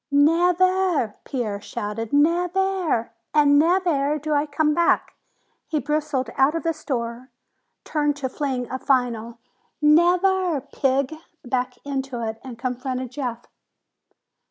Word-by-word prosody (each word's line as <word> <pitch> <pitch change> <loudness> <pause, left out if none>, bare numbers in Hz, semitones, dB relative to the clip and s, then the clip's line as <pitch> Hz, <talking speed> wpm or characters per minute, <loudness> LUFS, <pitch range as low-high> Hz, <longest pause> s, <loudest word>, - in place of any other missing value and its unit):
"Nev 330 +5 +4
air!" 370 - +2
Pierre 215 -6 -3
shouted. 210 +2 -5
"Nev 340 +5 +2
air, 375 -13 0 0.2
and 290 -1 +6
nev 360 +4 +3
air 295 -3 +1
do 305 +1 -2
I 290 +1 +1
come 300 +1 +1
back!" 340 +2 +2 0.5
He 310 - -1
bristled 290 -5 -1
out 270 +4 +4
of 330 - -2
the 330 -1 +1
store, 250 -4 -4 0.5
turned 295 -2 0
to 280 -2 -3
fling 260 -2 -3
a 260 - -3
final 245 -4 0 0.4
"Nev 345 +5 +4
air, 375 -5 +2
pig!" 270 0 0 0.3
back 250 0 -1
into 265 -4 -3
it, 220 0 -5
and 255 -3 -8
confronted 255 0 -3
Jeff. 245 -3 -4
285 Hz, 135 wpm, -23 LUFS, 250-320 Hz, 0.5 s, and